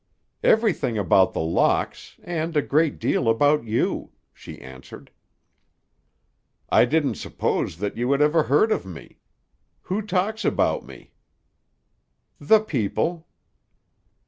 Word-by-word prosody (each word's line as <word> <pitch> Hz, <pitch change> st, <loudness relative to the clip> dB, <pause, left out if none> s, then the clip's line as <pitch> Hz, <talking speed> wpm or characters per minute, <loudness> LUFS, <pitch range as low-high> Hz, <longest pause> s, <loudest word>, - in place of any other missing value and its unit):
"Everything 210 Hz, -, +2 dB
about 95 Hz, -1 st, +3 dB
The -, -, -2 dB
Locks, 80 Hz, +1 st, -1 dB
and 165 Hz, -2 st, -3 dB
a 145 Hz, -, +2 dB
great 155 Hz, +1 st, +1 dB
deal 115 Hz, -, 0 dB
about 145 Hz, +4 st, +2 dB
you," 110 Hz, +1 st, -1 dB, 0.2 s
she -, -, -12 dB
answered. 65 Hz, 0 st, -13 dB, 1.6 s
"I -, -, +5 dB
didn't 150 Hz, +2 st, 0 dB
suppose 80 Hz, -, -2 dB
that 100 Hz, +2 st, -4 dB
you 120 Hz, +3 st, -1 dB
had 140 Hz, -, +2 dB
ever 150 Hz, +2 st, +3 dB
heard 150 Hz, +10 st, +2 dB
of -, -, 0 dB
me. 90 Hz, -4 st, -12 dB, 0.6 s
Who 190 Hz, +4 st, -2 dB
talks 210 Hz, +2 st, -2 dB
about -, -, 0 dB
me?" -, -, -15 dB, 1.3 s
"The 220 Hz, -1 st, +4 dB
people." 160 Hz, -, -2 dB
150 Hz, 120 wpm, -23 LUFS, 115-175 Hz, 1.6 s, I